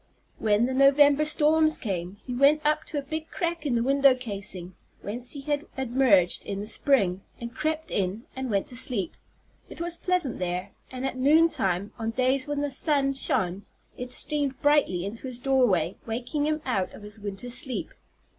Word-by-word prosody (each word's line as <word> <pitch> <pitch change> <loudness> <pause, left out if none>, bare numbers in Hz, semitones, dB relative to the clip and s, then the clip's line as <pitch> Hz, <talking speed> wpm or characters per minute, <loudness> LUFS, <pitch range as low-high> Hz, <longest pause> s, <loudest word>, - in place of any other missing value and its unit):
When 215 +1 +2
the 260 - -2
November 280 +2 +5
storms 310 +1 +3
came, 185 -2 -4
he 250 - -5
went 285 +4 +3
up 305 +1 +1
to 300 - -5
a 285 - -2
big 315 +3 -5
crack 335 -3 -3
in 250 - +1
the 230 - +1
window 275 0 +4
casing, 195 -7 -2 0.3
whence 240 +4 -2
he 285 - -4
had 290 +2 -2
emerged 245 -8 +3
in 200 - -5
the 205 - -4
spring, 210 -6 +2 0.2
and 235 0 -7
crept 310 +2 -3
in, 200 +4 -2
and 265 -1 -4
went 200 -3 0
to 245 - -9
sleep. 245 - -1 0.5
It - - -11
was 340 0 -1
pleasant 360 -10 0
there, 180 +2 -3 0.2
and 260 0 -5
at 270 - -3
noontime, 255 - +2
on 225 0 -2
days 260 +4 +1
when 290 -1 -2
the 290 -1 -2
sun 275 0 +1
shone, 190 -7 0 0.3
it 250 0 -7
streamed 285 -2 -2
brightly 290 -12 +3
into 225 +6 -6
his 250 -2 -4
doorway, 245 - +2
waking 250 +6 -2
him 310 0 -1
out 200 -8 -1
of - - -12
his 210 +1 -8
winter 205 +4 -5
sleep. 255 0 -2
255 Hz, 185 wpm, -26 LUFS, 205-290 Hz, 0.5 s, November